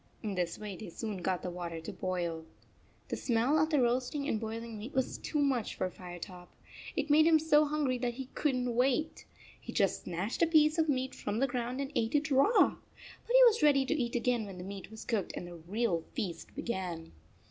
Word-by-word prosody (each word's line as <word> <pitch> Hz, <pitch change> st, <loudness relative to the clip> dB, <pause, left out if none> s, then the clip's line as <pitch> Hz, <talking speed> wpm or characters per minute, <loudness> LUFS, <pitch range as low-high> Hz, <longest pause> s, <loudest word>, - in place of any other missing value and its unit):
In 210 Hz, -2 st, -2 dB
this 175 Hz, -2 st, -1 dB
way 210 Hz, -2 st, -6 dB
they 215 Hz, -, -8 dB
soon 210 Hz, +3 st, -5 dB
got 185 Hz, 0 st, -1 dB
the 180 Hz, -, -3 dB
water 170 Hz, -2 st, -5 dB
to 160 Hz, -, -7 dB
boil. 175 Hz, -3 st, -2 dB, 0.7 s
The -, -, -1 dB
smell 245 Hz, +5 st, +2 dB
of 310 Hz, +1 st, +3 dB
the 300 Hz, -3 st, +3 dB
roasting 255 Hz, +4 st, 0 dB
and 220 Hz, -, 0 dB
boiling 225 Hz, 0 st, -5 dB
meat 230 Hz, +6 st, -7 dB
was 260 Hz, -1 st, 0 dB
too 305 Hz, -, -3 dB
much 270 Hz, -6 st, +1 dB
for 185 Hz, -, -2 dB
Firetop. 175 Hz, 0 st, -9 dB, 0.5 s
It -, -, -1 dB
made 310 Hz, +2 st, +6 dB
him 325 Hz, -1 st, +7 dB
so 305 Hz, -1 st, +4 dB
hungry 290 Hz, -4 st, 0 dB
that 240 Hz, -1 st, -1 dB
he 265 Hz, +1 st, -5 dB
couldn 255 Hz, -4 st, 0 dB
t 245 Hz, -, 0 dB
wait. 260 Hz, +6 st, 0 dB, 0.3 s
He -, -, -8 dB
just 195 Hz, -3 st, +1 dB
snatched 180 Hz, +6 st, -3 dB
a 335 Hz, -, +5 dB
piece 310 Hz, 0 st, +4 dB
of 320 Hz, -1 st, +2 dB
meat 260 Hz, -1 st, 0 dB
from 205 Hz, +1 st, -3 dB
the 270 Hz, -, +3 dB
ground 245 Hz, 0 st, -3 dB
and 275 Hz, 0 st, -4 dB
ate 225 Hz, +5 st, 0 dB
it 295 Hz, +1 st, +1 dB
raw! 275 Hz, -, +5 dB, 0.3 s
But 475 Hz, -, -7 dB
he -, -, +9 dB
was 460 Hz, -2 st, +5 dB
ready 285 Hz, -3 st, +5 dB
to 295 Hz, -, +1 dB
eat 240 Hz, -5 st, -1 dB
again 240 Hz, -2 st, +1 dB
when 190 Hz, -2 st, -8 dB
the 180 Hz, -, -7 dB
meat 195 Hz, 0 st, -7 dB
was 220 Hz, 0 st, -10 dB
cooked 220 Hz, -6 st, -1 dB
and -, -, -5 dB
the 175 Hz, -, -9 dB
real 175 Hz, +1 st, -1 dB
feast 170 Hz, -5 st, -4 dB
began. 180 Hz, -7 st, -4 dB
235 Hz, 220 wpm, -32 LUFS, 190-280 Hz, 0.7 s, he